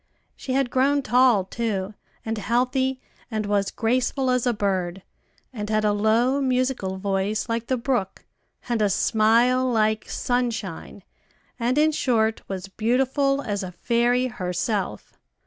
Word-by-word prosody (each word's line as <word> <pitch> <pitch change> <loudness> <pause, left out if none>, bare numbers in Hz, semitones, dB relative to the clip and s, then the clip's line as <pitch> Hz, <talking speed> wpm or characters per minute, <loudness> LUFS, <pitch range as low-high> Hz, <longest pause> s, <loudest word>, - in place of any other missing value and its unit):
She 260 - -5
had 265 -2 +1
grown 275 +2 +2
tall 245 -4 +4
too, 205 -2 -3 0.3
and 225 0 -2
healthy, 255 +4 0 0.3
and 215 -2 -2
was 205 -1 +1
graceful 255 +3 0
as 250 0 +1
a - - +4
bird, 190 -4 -2 0.5
and 210 -3 -5
had 215 0 +1
a 210 - +3
low, 230 +6 +2
musical 255 -7 0
voice 195 +2 -1
like 230 0 -2
the 260 - 0
brook, 235 -5 -2 0.4
and 235 -3 0
a 205 - +3
smile 230 +5 +3
like 215 -1 +1
sunshine, 225 -7 -3 0.6
and, 245 +3 0
in 310 +1 +4
short, 225 -6 +1
was 190 -1 -5
beautiful 265 +6 +1
as 205 -3 -2
a 185 -1 -6
fairy 240 +5 +1
herself. 185 - -3
230 Hz, 140 wpm, -24 LUFS, 205-255 Hz, 0.6 s, tall